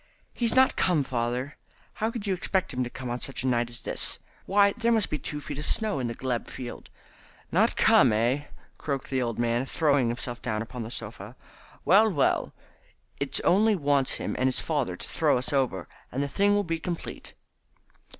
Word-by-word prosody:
"He's 235 -1 0
not 260 0 +5
come, 170 -6 +2
father. 125 +2 -2 0.4
How 220 - +2
could 230 -3 -5
you 195 - +1
expect 185 -2 -1
him 130 0 0
to 120 - -4
come 125 -1 -6
on 120 - -3
such 135 0 -3
a - - 0
night 120 -1 +1
as 120 0 -5
this? - - 0 0.3
Why, 200 +1 +4
there 235 0 0
must 220 -3 +2
be 150 - -1
two 150 - -5
feet 145 -1 -6
of 150 - -5
snow 215 -10 +1
in 125 - -1
the 115 - -4
glebe 125 -3 -2
field." 125 -2 -8 0.6
"Not - - +3
come, - - +5
eh?" 120 +7 +1 0.3
croaked 140 -2 -3
the 130 -1 +1
old 115 -3 -2
man, 120 +1 +1
throwing 140 -4 +2
himself 120 +1 -3
down 110 +1 -2
upon 125 +1 -7
the 110 - -5
sofa. 110 -1 -7 0.5
"Well, 215 +4 +6
well, 150 -9 +1 0.7
it - - 0
only 210 +4 +4
wants 140 -5 +2
him - - -3
and 130 - +3
his 130 - +1
father - - -1
to - - -7
throw - - +2
us 125 +3 -1
over, 125 - 0 0.2
and 135 +3 -1
the - - -1
thing 200 +8 +2
will 205 - +2
be 165 -3 -2
complete." 170 0 -6
135 Hz, 200 wpm, -27 LUFS, 120-185 Hz, 0.7 s, Well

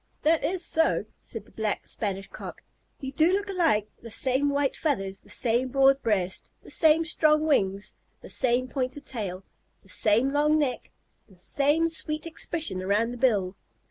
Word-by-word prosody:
"That 320 +1 +3
is 360 0 0
so," 320 0 +3 0.2
said - - -7
the - - -19
Black 220 -2 -2
Spanish 195 -2 -3
Cock. - - -9 0.4
"You 265 -1 -4
do 315 +5 +3
look 400 +1 -1
alike; 320 - +2
the 230 - -9
same 260 +5 0
white 280 -1 0
feathers, 195 -11 -1
the - - -21
same 240 +2 +1
broad 270 +1 +4
breast, 190 -4 -1
the - - -13
same 320 0 +4
strong 310 -1 +3
wings, 200 -9 +1 0.3
the - - -11
same 255 0 +1
pointed 260 +1 -4
tail, 195 -6 -5 0.4
the 195 - -20
same 225 +8 +2
long 300 +1 +3
neck, 285 -5 -1 0.4
the 190 - -19
same 290 - +3
sweet 315 -1 -3
expression 325 - -3
around 205 +5 +1
the 245 - -6
bill!" 205 -7 +1
265 Hz, 170 wpm, -27 LUFS, 210-305 Hz, 0.4 s, broad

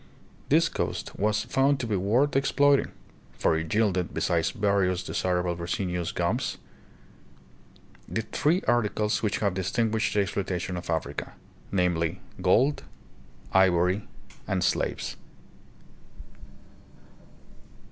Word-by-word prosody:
This - - +5
coast - - -3
was 105 +1 +1
found 135 +1 +2
to 125 - -2
be 110 -3 -1
worth 120 +10 +2
exploit 140 0 +4
ing; - - -5 0.5
for - - +2
it 80 0 -3
yielded, 100 -5 +1
besides 85 -1 +1
various 100 -3 +1
desirable 90 -1 -1
resinous 90 0 -2
gums, - - -1 1.7
three 170 +6 +2
articles 105 -3 +1
which 105 -2 0
have 100 -3 +1
distinguished 110 +4 0
the 105 - +4
exploitation 95 -2 -2
of 90 - -6
Africa, 80 -1 -3 0.4
namely, 90 -4 0 0.2
gold, 135 +3 +3 0.7
ivory, 95 +1 +3 0.4
and 95 -2 0
slaves. - - -1
100 Hz, 105 wpm, -27 LUFS, 90-110 Hz, 1.7 s, This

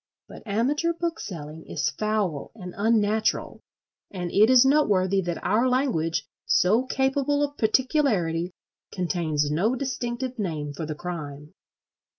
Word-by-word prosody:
But - - -11
amateur 285 +11 +1
bookselling 165 - -5
is 155 - -1
foul 205 -4 -2
and 180 -5 -8
unnatural; 215 0 +1 0.5
and 180 -3 -5
it 215 +3 +5
is 255 0 +7
noteworthy 200 -10 +3
that 175 -2 -4
our 220 +7 +2
language, 240 - 0 0.2
so 235 - +3
capable 275 +2 +1
of 290 0 -2
particularity, 220 - +1 0.4
contains 160 -5 -1
no 200 +11 +1
distinctive 255 -1 -3
name 155 -7 -3
for 155 +2 -5
the 155 - -4
crime. 150 -2 -7
205 Hz, 125 wpm, -25 LUFS, 165-255 Hz, 0.5 s, is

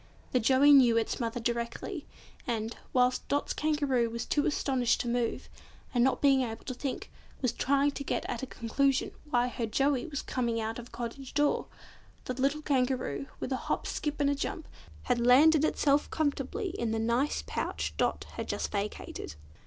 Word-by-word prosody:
The 255 - +3
Joey 265 +5 +5
knew 250 -5 +7
its 225 - 0
mother 235 0 -2
directly, 235 - -3 0.4
and, 225 -1 -2 0.2
whilst 250 0 +2
Dot's 285 0 0
Kangaroo 285 -6 +1
was 235 +1 -4
too 290 - +1
astonished 260 -5 +1
to - - -4
move, 240 -1 -1 0.5
and 240 -1 +3
not 265 +2 +1
being 270 -2 +5
able 225 -2 -4
to 255 - -3
think, 260 +1 -5 0.3
was 255 -4 +1
trying 280 +1 +2
to 280 - -6
get - - -2
at 235 - -3
a 265 - -4
conclusion 265 +4 0 0.2
why 245 -2 +2
her 240 -2 -3
Joey 270 +4 +1
was 285 -4 -4
coming 235 -3 -1
out 225 +1 -3
of 240 - -9
a - - -20
cottage 245 +3 -7
door, 295 0 +2 0.6
the 255 - -2
little 275 +4 0
Kangaroo, 260 0 0
with - - -4
a 260 - +1
hop - - 0
skip 295 -1 -3
and 285 -1 +3
a - - +2
jump, 310 +4 -4 0.4
had 245 -1 +1
landed 295 +5 +6
itself 290 -2 +2
comfortably 310 - -1
in 235 - -2
the 225 - 0
nice 235 +6 0
pouch - - -3
Dot - - 0
had - - -3
just - - -2
vacated. 200 - -4
255 Hz, 185 wpm, -30 LUFS, 235-285 Hz, 0.6 s, knew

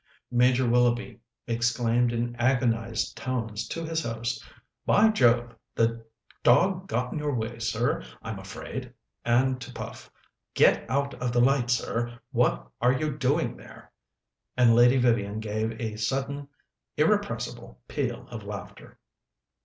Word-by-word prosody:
Major 125 +1 +3
Willoughby 120 0 +2 0.3
exclaimed 120 0 +1
in 120 0 -2
agonized 115 -2 +1
tones 115 -4 -3
to 165 0 -4
his 165 0 -1
host, 115 -1 -3 0.4
"By 220 +2 +5
Jove! 120 - +3 0.2
the 115 0 +1 0.4
dog 185 +9 +3
got 125 -2 -1
in - - -3
your 145 -2 -1
way, 115 0 -3
sir, 115 - 0 0.2
I'm - - -5
afraid;" - - -7 0.3
and 125 +2 +2
to 125 +1 -8
Puff, - - -8 0.5
"Get - - +4
out 140 +2 0
of 125 -1 0
the 120 - +3
light, 125 0 +3
sir; 120 0 -1
what - - +1
are 125 +1 +4
you 150 +2 -1
doing 150 +3 0
there?" - - -14 0.7
and 120 -2 +6
Lady 120 +3 +6
Vivian 110 -4 +1
gave 110 +1 -3
a 110 -3 -3
sudden 135 +5 -2 0.5
irrepressible - - 0
peal - - -3
of - - -7
laughter. - - -9
120 Hz, 135 wpm, -27 LUFS, 115-130 Hz, 0.7 s, and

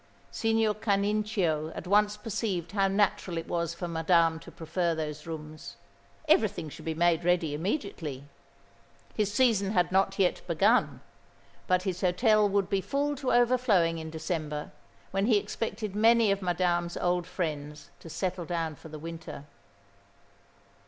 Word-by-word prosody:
Signor 225 -1 +1
Canincio 200 -6 0
at - - -6
once 210 +2 +3
perceived 205 -6 -3
how 195 -1 +2
natural 195 -3 0
it 165 - -4
was 170 -1 -2
for 175 - -4
Madame 165 0 +2
to - - -12
prefer 165 +1 -2
those 155 0 -5
rooms. 155 -1 -8 0.5
Everything 205 - +2
should - - -11
be 160 -1 -2
made 170 0 +2
ready 170 -3 +1
immediately. 160 - -3 0.9
His 210 -2 0
season 210 -4 +2
had 180 -3 +2
not 195 +1 +2
yet 185 -2 +2
begun; 200 +8 +2 0.7
but 185 0 +2
his 185 -2 -3
hotel 210 +3 +3
would 200 -1 +1
be 195 -1 0
full 285 +6 -1
to 260 -2 -1
overflowing 235 -9 +3
in 160 0 -6
December, 155 -2 -4 0.4
when 195 +2 0
he 225 -4 +5
expected 210 0 -4
many 225 0 +5
of 195 0 0
Madame's 175 -1 0
old 175 0 0
friends 150 -5 -5
to 165 - -11
settle 180 +1 -3
down 165 -2 -2
for 160 - -13
the 155 - -8
winter. 160 -2 -8
180 Hz, 145 wpm, -28 LUFS, 165-210 Hz, 0.9 s, he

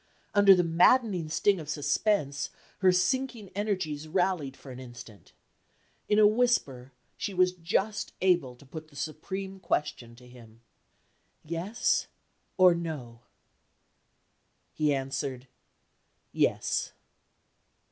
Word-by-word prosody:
Under 200 -2 +7
the 180 - +2
maddening 175 +1 +3
sting 195 +4 +2
of 155 -2 -8
suspense, 145 0 0 0.3
her 185 -2 +5
sinking 225 +3 0
energies 185 -7 -3
rallied 175 -5 -1
for 135 - -12
an 125 - -9
instant. 120 -4 -12 0.8
In 210 - +3
a 215 - +7
whisper, 205 - +1 0.3
she 200 - -4
was 185 0 +4
just 185 +4 -2
able 175 -9 +2
to 130 - -18
put 155 +3 -9
the 150 - -21
supreme 190 +7 -5
question 125 -9 -2
to 125 +1 -16
him. 115 -2 -16 0.8
"Yes? 170 +8 0 0.5
or 185 -1 +7
No?" 150 -9 -6 1.5
He 150 -1 +1
answered: 135 -1 -3 0.8
"Yes." - - 0
165 Hz, 110 wpm, -28 LUFS, 135-195 Hz, 1.5 s, Under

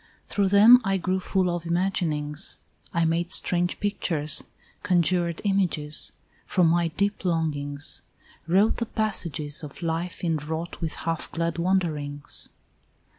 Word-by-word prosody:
Through 200 -1 +1
them 215 +6 +7
I 195 -1 +1
grew 185 +1 -1
full 190 0 0
of 170 -1 -4
imaginings, 170 -3 -1 0.3
I 170 -1 +1
made 170 +2 0
strange 175 -1 +3
pictures, 165 -7 +2 0.4
conjured 175 -3 +1
images 180 -7 0 0.4
From 180 - +2
my 170 0 +2
deep 200 +5 -2
longings; 145 -5 -2 0.5
wrote 195 +6 +3
the 235 - -2
passages 165 -10 0
Of 150 +2 -9
life 165 +2 -3
inwrought 160 +1 -3
with 160 -3 -3
half 165 -1 -3
glad 170 0 -2
wonderings. 155 -6 -2
170 Hz, 125 wpm, -25 LUFS, 155-190 Hz, 0.5 s, them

